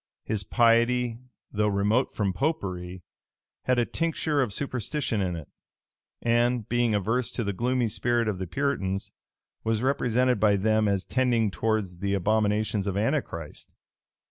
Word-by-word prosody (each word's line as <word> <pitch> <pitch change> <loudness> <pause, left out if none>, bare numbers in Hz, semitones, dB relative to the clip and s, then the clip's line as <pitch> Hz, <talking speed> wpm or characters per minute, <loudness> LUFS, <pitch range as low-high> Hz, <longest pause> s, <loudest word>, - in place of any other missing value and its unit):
His 105 -3 -2
piety, 120 +1 +3 0.3
though 105 0 +1
remote 105 +5 +1
from 100 -3 0
Popery, 90 - -3 0.6
had 125 -1 +2
a 120 - +3
tincture 160 -2 0
of 125 -5 0
superstition 130 -1 -2
in 90 -2 -1
it; 80 -4 -8 0.8
and, 120 -1 +2
being 120 -2 +1
averse 115 +5 0
to 120 - -2
the 100 -1 -2
gloomy 125 +3 0
spirit 120 +1 +1
of 100 -4 -2
the 95 - -3
Puritans, 100 -6 -2 0.5
was 110 +1 0
represented 125 -3 +2
by 105 -1 +4
them 110 +2 +2
as 100 -1 0
tending 120 -5 +1
towards 105 -5 -1
the 100 +1 0
abominations 105 +1 +1
of 100 0 -1
Antichrist. 105 - -3
110 Hz, 145 wpm, -27 LUFS, 100-125 Hz, 0.8 s, by